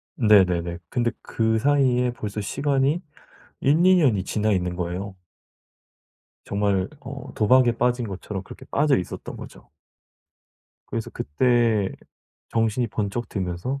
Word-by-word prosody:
네네네. 90 -6 +3
근데 120 -1 0
그 110 -1 0
사이에 130 -2 +2
벌써 105 -3 -5
시간이 140 - 0 0.6
1-2 170 +7 +4
년이 120 - +3
지나 110 +2 0
있는 90 -2 0
거예요. 90 +3 -4 1.3
정말 100 -1 0
어 135 0 -8
도박에 120 +3 +4
빠진 125 -1 +1
것처럼 95 0 -6
그렇게 - - -12
빠져 145 -1 +3
있었던 90 - -6
거죠. - - -12 1.2
그래서 - - -4
그때 115 - +1 0.6
정신이 115 +2 +1
번쩍 105 +2 -3
들면서 95 +8 -3
110 Hz, 250 characters per minute, -24 LUFS, 95-130 Hz, 1.3 s, 1-2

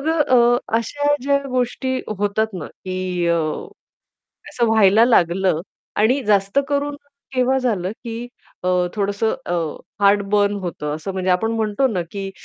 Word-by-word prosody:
मग 295 - -3
अ, 325 -1 +3
अ, 245 -3 +4 0.2
अशा 290 +6 0
ज्या 280 +1 +2
गोष्टी 255 +1 -1 0.2
होतात 205 +2 0
ना, 170 -5 -5
की 185 -1 -3
अ, 170 - +3 1.1
असं 240 - 0
व्हायला 220 0 +5
लागलं 185 -6 +2 0.4
आणि 250 +6 +3
जास्त 200 +3 +3
करून 285 0 0 0.4
केव्हा 255 +1 +2
झालं, 210 -8 -1
की 235 0 -5 0.4
अ, - - -1 0.3
थोडंसं 205 +2 0
अ, - - -2 0.5
हार्ट 200 +1 +5
बर्न 205 0 +3
होतं 150 -4 -3
असं 160 +5 -5
म्हणजे 185 0 -2
आपण 225 +5 +1
म्हणतो 220 +3 +1
ना, 200 -8 -1
की 195 -1 -5
215 Hz, 150 wpm, -21 LUFS, 190-255 Hz, 1.1 s, व्हायला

